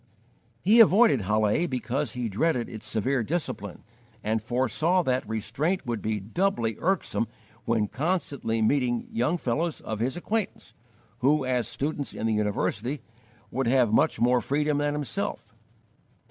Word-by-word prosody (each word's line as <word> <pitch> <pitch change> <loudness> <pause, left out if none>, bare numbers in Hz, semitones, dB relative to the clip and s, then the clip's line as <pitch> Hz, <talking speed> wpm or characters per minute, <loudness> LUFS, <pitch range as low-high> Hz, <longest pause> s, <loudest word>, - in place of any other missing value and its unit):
He 215 +6 +6
avoided 220 - +6
Halle 105 - +2
because 130 0 -2
he 125 -1 -2
dreaded 120 +4 0
its 110 -2 -8
severe 125 +4 0
discipline, 110 - -3 0.4
and 110 +1 0
foresaw 130 - +1
that 125 -5 -1
restraint 120 - -1
would 120 -3 -2
be 110 -1 -1
doubly 115 - 0
irksome 185 -10 0 0.4
when 110 -2 +1
constantly 140 - -1
meeting 120 -1 +1
young 130 +9 +1
fellows 155 +4 -1
of 110 -1 -4
his 130 +7 -1
acquaintance 215 +4 -3 0.5
who, 140 +2 +3
as 125 -2 0
students 145 0 -3
in - - -3
the 110 - +2
university, 105 +5 -1 0.5
would 130 -1 -1
have 120 -3 +3
much - - +3
more 125 +1 +3
freedom 150 +1 0
than 145 0 0
himself. 145 -6 -4
125 Hz, 140 wpm, -27 LUFS, 110-150 Hz, 0.5 s, He